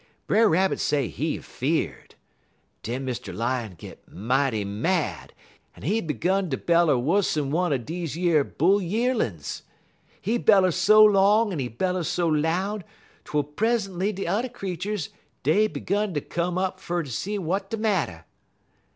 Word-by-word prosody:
Brer 220 0 +4
Rabbit 190 +4 +2
say 140 -7 0
he - - -2
fear'd. - - -3 0.7
Den 125 +4 -4
Mr. 125 -2 -4
Lion 115 -4 -2
git - - -11
mighty 120 +1 0
mad, 145 - -1 0.5
en - - -13
he 215 +7 +1
'gun 180 +4 0
ter 130 - -1
beller 170 -3 +3
wuss'n 150 0 +1
one 175 +2 +1
er 140 - +2
deze 160 +5 -5
yer 170 -4 +3
bull 190 +9 +2
yearlin's. 185 - -1 0.6
He 230 +5 -1
beller 195 -5 +5
so 215 +5 +6
long 205 +1 +4
en 160 - -3
he 130 - -1
beller 180 +10 -1
so 175 +1 0
loud 175 +7 0 0.4
twel 150 -1 0
present'y 195 - -1
de 195 -1 -5
t'er 235 +6 0
creeturs 190 -2 -4 0.3
dey 200 +10 +3
'gun 205 -2 -2
ter 145 - 0
come 175 +4 -2
up 185 0 -1
fer 175 -1 -2
ter 145 - -9
see 200 - -3
w'at 195 +2 -2
de 225 - -3
matter. 190 - -1
175 Hz, 150 wpm, -25 LUFS, 145-200 Hz, 0.7 s, so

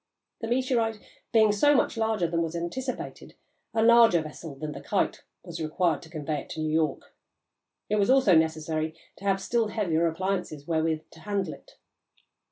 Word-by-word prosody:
The 225 - -4
meteorite 235 -3 0 0.3
being 220 -2 +5
so 290 +8 +4
much - - +2
larger 220 -5 0
than 165 0 0
was 165 0 -2
anticipated, 250 +10 -5 0.4
a 220 0 +1
larger 230 -8 +6
vessel 155 -1 -8
than 150 +2 -5
the - - -8
Kite - - -1 0.2
was - - -7
required 160 0 0
to 165 - -13
convey 155 -2 -3
it - - -15
to - - -6
New 155 0 -1
York; 155 -3 -1 0.7
it 210 - +1
was 200 -1 +2
also 260 -8 +5
necessary 160 -1 +1 0.2
to 200 - -11
have 195 -1 +2
still 230 +3 0
heavier 170 -6 +1
appliances 180 -3 -3
wherewith 160 -1 0
to 160 - -15
handle 195 -1 -2
it. - - -16
175 Hz, 175 wpm, -27 LUFS, 160-220 Hz, 0.7 s, larger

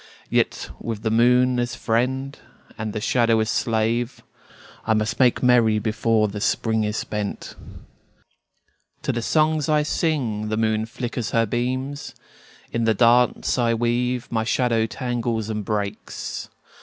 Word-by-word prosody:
Yet - - 0
with 110 -2 -5
the 110 - 0
moon 125 +2 +4
as 120 0 -2
friend 130 +4 -1 0.4
and 110 -1 -4
the 105 - -3
shadow 115 0 +2
as 110 0 0
slave 115 +1 0 0.6
I 110 - +3
must 110 +1 -1
make 125 -1 +3
merry 120 -3 +4
before 110 0 +1
the 105 0 -6
Spring 110 0 +1
is 105 +1 -2
spent. 105 -1 -4 1.5
To - - 0
the 120 - -2
songs 155 +3 +1
I 150 -1 +3
sing 125 -10 -1
the 110 - -1
moon 110 0 0
flickers 120 -1 -4
her 115 - +4
beams; 130 +5 -3 0.6
In 115 -1 0
the 110 -1 +3
dance 120 +3 +3
I 115 -1 +2
weave 120 +1 0
my 110 -1 0
shadow 115 -1 +1
tangles 115 -3 -2
and 105 -1 -3
breaks. 105 0 -4
115 Hz, 145 wpm, -23 LUFS, 110-125 Hz, 1.5 s, moon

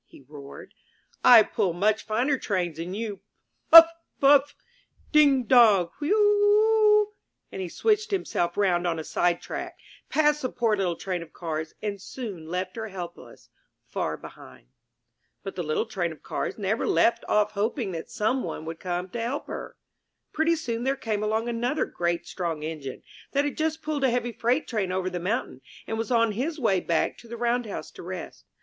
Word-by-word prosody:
he 135 - -17
roared. 140 -1 -11 0.5
"I 235 -3 +9
pull 185 -3 -1
much 210 +5 +1
finer 250 +5 +1
trains 175 -6 -2
than 175 +3 -5
you! 210 -3 -4 0.5
Puff, 330 0 +12 0.3
Puff! 285 +1 +5 0.6
Ding, 285 -4 +5
dong! 215 -8 +5
Wheu 290 - -1
eu 420 - +4 0.9
eu!" 420 - -25 0.4
And 190 - -5
he 180 - -4
switched 430 - +1
himself 175 - -1
round 180 -3 +2
on 165 -1 -1
a 160 - -4
sidetrack, 175 +2 -2 0.3
passed 300 -1 +2
the 255 - -1
poor 230 -3 +1
little 185 -4 -1
Train 185 -1 -4
of 165 -1 -11
Cars 160 -2 -5
and 200 -2 -3
soon 200 -10 -7
left 185 +4 -4
her 220 0 -4
helpless, 180 -4 -10 0.4
far - - -3
behind. 65 -2 -14 0.7
But 195 - -6
the 180 - -3
little 155 +6 -1
Train 185 -7 -2
of 160 - -13
Cars - - -4
never 210 +1 -1
left 235 - +2
off 210 0 +2
hoping 215 +1 -2
that 165 -2 -6
some 235 +5 0
one 155 - -5
would 165 0 -6
come 180 0 -3
to 235 +4 -5
help 245 +5 -3
her. - - -7 0.6
Pretty 320 +2 +2
soon 240 -7 -3
there 270 +1 +1
came 220 -6 -3
along 220 +2 -1
another 240 +5 -1
great 170 0 -2
strong 165 -4 -4
Engine, 155 -4 -6 0.3
that 285 +1 +2
had 290 - -3
just 315 0 -2
pulled 300 -2 -2
a 265 - +4
heavy 240 0 -1
freight 245 +6 0
train 210 -6 -2
over 185 0 -2
the 180 - -3
mountain, 205 +8 -3 0.2
and 225 - -3
was 225 - -3
on 230 -2 +3
his 275 +10 -3
way 200 -7 +2
back 170 -2 -1
to 235 - -15
the 235 +1 -7
round 240 0 0
house 200 - -6
to - - -11
rest. 180 -1 -8
215 Hz, 185 wpm, -26 LUFS, 175-250 Hz, 0.9 s, Puff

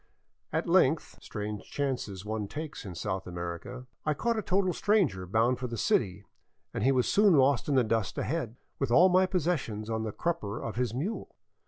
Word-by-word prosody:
At - - -1
length - - +3
— - - -32
strange 105 0 -5
chances 125 -9 -3
one 110 -1 -3
takes 155 +3 -6
in 95 -3 -7
South 95 0 -3
America 85 +8 -6
— - - -54
I 155 -1 +1
caught 235 +7 0
a 220 - 0
total 185 -2 +1
stranger 170 - +1
bound 115 +6 +2
for 130 - -3
the 115 -1 -5
city, 100 -2 +1 0.5
and - - -2
he 135 - +5
was 130 -2 +2
soon 205 -4 +5
lost 135 -1 +3
in 140 - +2
the 130 - +5
dust 110 -3 -1
ahead, 130 -6 -2 0.2
with 135 - 0
all 175 +10 +6
my 185 +1 +4
possessions 145 - -1
on 110 0 -1
the 110 -1 -3
crupper 115 -8 -2
of 115 - -5
his 125 -2 0
mule. 160 - -4
125 Hz, 200 wpm, -29 LUFS, 105-160 Hz, 0.5 s, all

